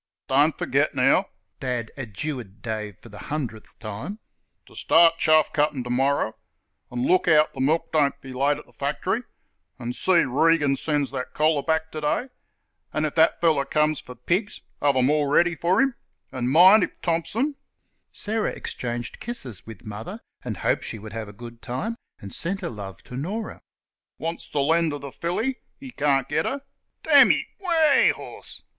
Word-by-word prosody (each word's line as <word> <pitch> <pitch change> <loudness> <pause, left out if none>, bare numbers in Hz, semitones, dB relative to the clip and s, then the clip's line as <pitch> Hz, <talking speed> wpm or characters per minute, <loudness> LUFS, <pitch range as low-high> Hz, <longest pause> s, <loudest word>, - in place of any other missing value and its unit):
"Don't - - +3
f'get, - - +1
now," - - +3 0.3
Dad 125 -3 -3
adjured 120 -4 -6
Dave 105 -4 -4
for 120 - -15
the 105 - -11
hundredth 125 -8 -5
time, 115 - -6 0.5
"ter - - -17
start 165 -1 +4
chaff 155 -1 +4
cuttin' 150 -3 +1
t'morrer, 125 -1 +1 0.6
an' 125 +1 -1
look 185 0 +3
out 155 -2 +5
th' - - -9
milk 150 +5 +1
doesn't 145 -3 +2
be 130 -1 -10
late 140 +3 +1
at 150 - -11
th' - - -24
fact'ry 145 - -1 0.6
an' 120 -1 -4
see 175 +4 +3
Regan 145 +1 +3
sends 145 -1 -1
that 130 -2 -5
collar 155 -1 +3
back 160 +1 -1
t'day 155 - -1 0.6
an' 155 0 0
if 150 - -2
thet 160 0 +4
feller 160 -5 +3
comes 150 +1 +1
for 125 - -11
pigs, 180 - -1 0.2
have 145 -1 +3
them 130 +2 +3
all 150 -1 +2
ready 175 +4 +3
for 180 +5 +1
'im 270 -1 +3 0.4
an' 125 0 -2
min' 185 +8 +8
if - - -3
Thompson" 215 - 0 0.6
(Sarah 215 +1 -2
exchanged 120 -1 -5
kisses 130 - -6
with 110 - -11
Mother 110 - -7 0.2
and 110 -6 -4
hoped - - 0
she - - -4
would 110 0 -10
have 115 -2 -5
a - - -9
good 115 +3 -11
time, 195 - -3 0.2
and 100 - -10
sent 195 +4 -3
her 175 - -3
love 100 -5 -8
to 125 - -10
Norah) 200 - -4 0.6
"wants 165 +1 -5
th' - - -20
lend 160 +2 +2
o' 145 - -4
th' 140 -1 -8
filly, 225 +10 -2 0.2
he 270 -1 -10
carn't 140 - +1
git - - 0
her; 275 +1 -3 0.4
d - - -10
n - - +9
ye, - - +2
weh, 330 -6 +4
horse!" - - -10
145 Hz, 175 wpm, -24 LUFS, 125-170 Hz, 0.6 s, n